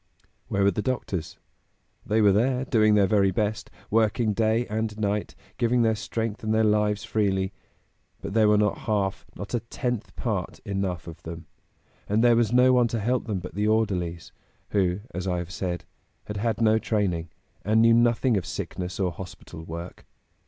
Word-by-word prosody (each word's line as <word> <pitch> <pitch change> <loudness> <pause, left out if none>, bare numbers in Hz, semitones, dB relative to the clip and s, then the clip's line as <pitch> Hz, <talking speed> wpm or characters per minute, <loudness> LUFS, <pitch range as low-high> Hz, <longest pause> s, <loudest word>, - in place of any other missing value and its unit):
'" - - -42
Where 100 - 0
were 100 - +5
the 100 - -2
doctors? 95 -9 -3 0.7
They 110 +1 +2
were 105 -1 +6
there, 125 +6 +1
doing 110 -4 +4
their 100 -1 +5
very 100 0 +3
best; 105 +3 -2 0.2
working 110 0 +2
day 110 +2 +1
and 110 -1 -3
night, 105 -1 -1 0.2
giving 120 0 +3
their 110 -1 +3
strength 110 +1 -4
and 110 - -1
their 110 0 +3
lives 105 -1 +2
freely; 100 -3 0 0.7
but - - -6
there 110 -1 +4
were 105 - +5
not 105 -1 +1
half, 100 -2 -1
not 100 - -7
a 120 - +2
tenth 120 0 -4
part, 105 -8 -3
enough 95 -4 -2
of 85 -2 -10
them; 85 0 -8 0.6
and 105 +3 +2
there 120 -1 +6
was 115 -2 +2
no 125 +1 +5
one 125 -1 +4
to 115 -1 -2
help 120 +3 0
them 105 -3 -1
but 90 -1 -7
the 105 +3 0
orderlies, 95 -6 0 0.4
who, 95 -1 +1
as 90 +2 -4
I 90 -1 0
have 85 0 -5
said, 90 -1 -3 0.4
had 105 - -5
had 115 +2 -1
no 110 0 +4
training, 90 -8 -1 0.3
and 110 +2 +3
knew 115 0 +6
nothing 120 0 +3
of 90 - -2
sickness 90 0 -5
or 95 -2 +1
hospital 85 -2 -9
work. 85 +2 -8
105 Hz, 185 wpm, -26 LUFS, 95-115 Hz, 0.7 s, were